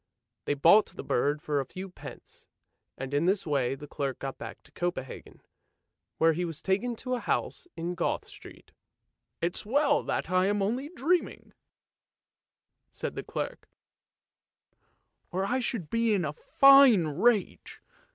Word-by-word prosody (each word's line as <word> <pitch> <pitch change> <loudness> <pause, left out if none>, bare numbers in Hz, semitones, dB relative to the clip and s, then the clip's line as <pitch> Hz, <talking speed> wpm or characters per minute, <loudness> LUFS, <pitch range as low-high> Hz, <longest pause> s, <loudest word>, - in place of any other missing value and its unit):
They 145 - 0
bought 170 +9 +6
the - - -9
bird 145 +4 0
for 145 -1 0
a 135 - -2
few 185 +6 -7
pence, 185 - -13 0.5
and 135 +1 -6
in 145 +3 +1
this 195 +2 +1
way 135 -4 0
the 145 - -10
clerk 140 -2 -4
got 135 -1 -6
back 115 0 -9
to - - -20
Copenhagen, 175 -7 -5 0.7
where 165 0 +4
he 175 +3 -2
was 165 -3 -5
taken 220 +6 -1
to 255 +3 -4
a 250 - 0
house 350 - -2
in 170 +2 -3
Goth 175 - -2
Street. - - -14 0.4
" - - -55
It's 175 +1 -1
well 285 +7 +2
that - - -2
I'm 195 +2 +2
only 250 +8 -2
dreaming," 345 +2 -1 1.4
said - - -5
the - - -5
clerk, - - -6 0.8
" - - -47
or 190 +1 -1
I 255 +5 0
should 230 -9 -3
be 230 -2 +2
in 180 -4 0
a 150 - -3
fine 275 - +6
rage! 195 +8 0
185 Hz, 155 wpm, -28 LUFS, 150-230 Hz, 1.4 s, bought